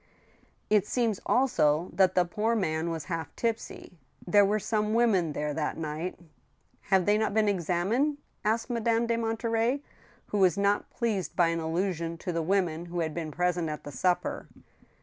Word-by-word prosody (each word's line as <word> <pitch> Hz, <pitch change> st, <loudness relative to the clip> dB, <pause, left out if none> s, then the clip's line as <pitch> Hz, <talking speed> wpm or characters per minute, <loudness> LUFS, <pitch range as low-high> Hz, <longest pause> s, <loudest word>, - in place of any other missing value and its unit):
" -, -, -35 dB, 0.3 s
It 210 Hz, -1 st, +4 dB
seems 230 Hz, -5 st, 0 dB
also 170 Hz, -, +2 dB
that 190 Hz, -2 st, +3 dB
the 180 Hz, -, +4 dB
poor 215 Hz, +6 st, 0 dB
man 160 Hz, -5 st, -1 dB
was 165 Hz, -3 st, -3 dB
half 165 Hz, +1 st, -5 dB
tipsy. 225 Hz, -6 st, -4 dB, 0.3 s
There 205 Hz, +3 st, +5 dB
were 205 Hz, +2 st, +2 dB
some 215 Hz, 0 st, -1 dB
women 195 Hz, -10 st, +3 dB
there 150 Hz, 0 st, -2 dB
that 150 Hz, 0 st, -2 dB
night 160 Hz, +3 st, -4 dB, 0.2 s
— -, -, -41 dB
" -, -, -42 dB
" -, -, -38 dB
Have 190 Hz, -3 st, +4 dB
they 210 Hz, +1 st, +3 dB
not 220 Hz, -1 st, 0 dB
been 215 Hz, -1 st, +3 dB
examined? 200 Hz, -, +1 dB
" -, -, -42 dB
asked 225 Hz, +3 st, 0 dB
Madame 230 Hz, 0 st, +1 dB
de 230 Hz, 0 st, +1 dB
Monterey, 230 Hz, +3 st, 0 dB, 0.5 s
who 210 Hz, -, -1 dB
was 185 Hz, 0 st, +4 dB
not 200 Hz, +1 st, +1 dB
pleased 220 Hz, -6 st, -2 dB
by 170 Hz, -2 st, +4 dB
an 165 Hz, 0 st, -1 dB
allusion 165 Hz, 0 st, -2 dB
to 180 Hz, -, -4 dB
the 165 Hz, -1 st, -1 dB
women 175 Hz, -2 st, 0 dB
who 175 Hz, 0 st, -3 dB
had 160 Hz, -2 st, -2 dB
been 165 Hz, -1 st, -4 dB
present 175 Hz, +1 st, 0 dB
at 150 Hz, -, -5 dB
the 145 Hz, -, -8 dB
supper. 180 Hz, +6 st, -1 dB
190 Hz, 190 wpm, -28 LUFS, 165-220 Hz, 0.5 s, There